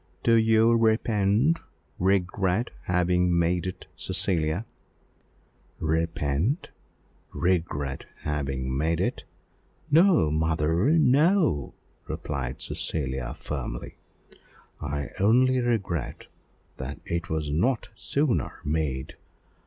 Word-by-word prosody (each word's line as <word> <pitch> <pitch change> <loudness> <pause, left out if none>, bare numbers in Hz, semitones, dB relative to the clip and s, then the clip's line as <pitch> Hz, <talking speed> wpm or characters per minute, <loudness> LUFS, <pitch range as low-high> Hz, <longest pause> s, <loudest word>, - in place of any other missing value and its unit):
"Do 115 - +4
you 110 0 +5
repent 110 +5 +2 0.4
regret 95 +3 +1
having 90 0 +2
made 85 +1 +1
it, 95 - -6
Cecilia?" 85 +2 0 1.1
"Repent 80 - -1 0.6
regret 80 -6 -1
having 65 -3 -2
made 80 +4 0
it. - - -2 0.7
No, 165 - +5
mother, 80 - +1
no!" 155 - +3 0.3
replied 65 -2 -4
Cecilia 65 -3 -2
firmly. - - -6 0.8
"I 70 -1 -3
only 125 +6 +4
regret 100 - -2 0.5
that 65 +2 -6
it 85 0 -3
was 75 -2 -2
not 115 - +1
sooner 140 -3 0
made. 75 -3 -2
85 Hz, 85 wpm, -26 LUFS, 75-115 Hz, 1.1 s, you